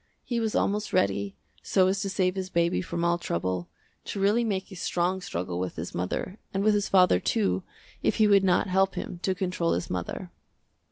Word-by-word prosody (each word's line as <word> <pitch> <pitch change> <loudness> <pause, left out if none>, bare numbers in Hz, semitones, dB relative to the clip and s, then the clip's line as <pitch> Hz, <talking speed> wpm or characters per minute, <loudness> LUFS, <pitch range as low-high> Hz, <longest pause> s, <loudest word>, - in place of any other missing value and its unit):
He 240 -2 -1
was 220 -2 -1
almost 210 +1 0
ready, 100 0 +1 0.3
so 190 -2 +3
as 190 +1 +1
to 195 - -2
save 185 -1 +1
his 190 -1 -4
baby 170 -1 +1
from 170 -1 -3
all 170 0 +2
trouble, 90 - -2 0.4
to 200 - -4
really 205 +5 +3
make 200 -3 -2
a - - -8
strong 180 +1 0
struggle 90 - -3
with 90 -1 -3
his 85 +2 -5
mother 95 - -3
and 195 +1 -1
with 215 0 +4
his 205 -1 0
father, 180 - +5
too, 95 -2 +1 0.4
if - - +1
he 215 - +4
would 200 -1 +5
not 185 0 +3
help 190 0 +2
him 175 - -5
to 190 0 0
control 180 -2 0
his 85 - -3
mother. 90 -2 -4
185 Hz, 205 wpm, -27 LUFS, -, 0.4 s, father